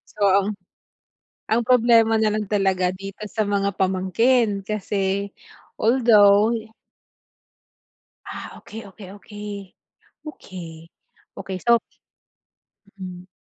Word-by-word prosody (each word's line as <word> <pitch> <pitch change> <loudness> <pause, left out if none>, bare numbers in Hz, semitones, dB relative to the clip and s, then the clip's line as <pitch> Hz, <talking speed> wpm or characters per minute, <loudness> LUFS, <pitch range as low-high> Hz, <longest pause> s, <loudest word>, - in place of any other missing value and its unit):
Oo. 200 0 +2 1.0
Ang 230 +2 +3
problema 230 -2 +5
nalang 215 -1 0
talaga 190 -3 +1
dito 195 +1 -9
sa 215 +2 -1
mga 200 -1 -1
pamangkin, 195 +4 +1
kasi 200 -1 -2 0.5
although 220 -2 +5 1.7
Ah, - - -8
okey, 225 +1 -10
okey, 190 0 -12
okey. 205 -1 -9 0.5
Okey. 170 - -10 0.5
Okey, 190 -1 -5
so 235 0 +6 1.2
Mm. 180 0 -8
200 Hz, 85 wpm, -22 LUFS, 190-220 Hz, 1.7 s, so